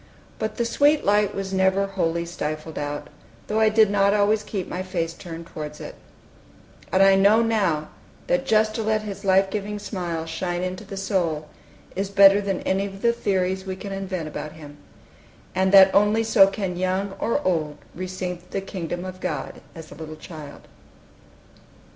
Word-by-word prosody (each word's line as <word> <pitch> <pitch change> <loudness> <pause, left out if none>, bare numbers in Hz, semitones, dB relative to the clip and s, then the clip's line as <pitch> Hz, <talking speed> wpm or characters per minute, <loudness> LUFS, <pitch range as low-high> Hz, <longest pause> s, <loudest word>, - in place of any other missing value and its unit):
But 220 - -3
the 235 - 0
sweet 290 +5 +3
light 205 0 +2
was 195 -1 -4
never 190 +1 +2
wholly 170 -4 -1
stifled 155 -1 -5
out, 145 0 -4 0.4
though 215 - -1
I 220 0 +5
did 215 -1 +4
not 200 0 +3
always 210 +1 +3
keep 200 -3 -4
my 180 - -4
face 175 -3 -3
turned 170 -1 -9
towards 150 -2 -7
it: - - -8 1.0
and 190 +1 +5
I 195 0 +7
know 200 +4 +5
now, 190 -10 0 0.4
that 265 0 0
just 215 -2 +3
to 225 - -2
let 215 0 0
his 200 -1 -7
lifegiving 195 +2 +1
smile 175 -5 -4
shine 175 +2 -3
into 185 0 -4
the 195 - -8
soul 170 -6 -1 0.5
is 195 +1 -2
better 200 0 +7
than 195 -2 -2
any 195 +1 0
of 195 0 -11
the 235 0 +4
theories 190 -3 -1
we 190 - -3
can 200 +1 -8
invent 190 -4 -4
about 150 0 -6
Him; 145 -2 -12 0.8
and 190 0 +1
that 195 -1 +8
only 210 +2 +4
so 220 -3 +6
can 195 -3 -3
young 185 +2 -1
or 230 - 0
old 155 -5 0 0.2
receive 180 0 -5
the 195 - -2
kingdom 175 -2 -5
of 185 0 -7
God - - -4
as 160 -1 -10
a - - -8
little 155 -1 -8
child. 155 -2 -10
190 Hz, 175 wpm, -24 LUFS, 170-205 Hz, 1.0 s, that